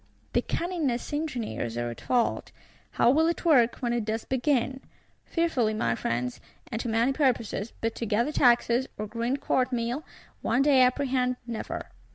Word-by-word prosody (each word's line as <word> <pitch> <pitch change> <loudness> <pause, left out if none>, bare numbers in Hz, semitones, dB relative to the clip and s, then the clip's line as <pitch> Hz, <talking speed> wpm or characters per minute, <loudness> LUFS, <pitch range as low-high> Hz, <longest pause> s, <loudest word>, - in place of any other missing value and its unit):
The - - +3
cunningest 315 -9 -2
engineers 240 - -3
are 120 0 -2
at 115 - -10
fault. 245 -2 0 0.4
How 235 - +4
will 320 +4 +3
it 340 +1 -2
work, 250 -8 +5
when 240 -2 0
it 240 -2 0
does 220 +1 -3
begin? 265 0 0 0.5
Fearfully, 260 -11 +1
my 115 - +1
Friends; 120 +2 -2 0.3
and 225 0 -2
to 235 - -3
many 230 +4 +2
purposes; 235 -6 0
but 225 0 0
to 230 - -3
gather 235 +7 +1
taxes, 245 -1 +3
or 210 - -3
grind 235 +5 -2
court 255 0 +1
meal, 245 +4 -2 0.4
one 245 +4 +2
may 280 -3 +5
apprehend, 255 -1 +2
never. 235 -2 -5
245 Hz, 165 wpm, -27 LUFS, 225-270 Hz, 0.5 s, work